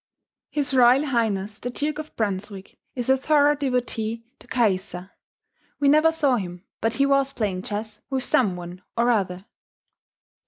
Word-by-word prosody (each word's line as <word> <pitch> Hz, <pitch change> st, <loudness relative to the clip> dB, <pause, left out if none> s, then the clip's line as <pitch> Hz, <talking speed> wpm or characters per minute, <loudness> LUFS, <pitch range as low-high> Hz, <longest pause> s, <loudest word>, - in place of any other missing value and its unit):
H. 290 Hz, -2 st, -1 dB
R. 245 Hz, -2 st, +7 dB
H. 225 Hz, -7 st, -1 dB
the 245 Hz, -, -3 dB
Duke 295 Hz, +4 st, -3 dB
of 310 Hz, 0 st, -8 dB
Brunswick 200 Hz, -2 st, -4 dB, 0.2 s
is 245 Hz, -2 st, -3 dB
a 265 Hz, -, +5 dB
thorough 290 Hz, +2 st, +3 dB
devotee 245 Hz, -5 st, -2 dB, 0.2 s
to -, -, -18 dB
Caïssa; 190 Hz, -5 st, -1 dB, 0.7 s
we 285 Hz, -, +2 dB
never 310 Hz, +2 st, +5 dB
saw 285 Hz, -6 st, +2 dB
him 180 Hz, -3 st, -6 dB, 0.2 s
but 225 Hz, +1 st, 0 dB
he 275 Hz, -, +2 dB
was 275 Hz, -1 st, +2 dB
playing 200 Hz, -7 st, -2 dB
chess 210 Hz, +1 st, -5 dB
with 265 Hz, -1 st, -1 dB
some 205 Hz, -8 st, +2 dB
one 175 Hz, +1 st, -8 dB, 0.2 s
or 240 Hz, +1 st, +3 dB
other. 190 Hz, -4 st, -1 dB
235 Hz, 155 wpm, -24 LUFS, 200-275 Hz, 0.7 s, R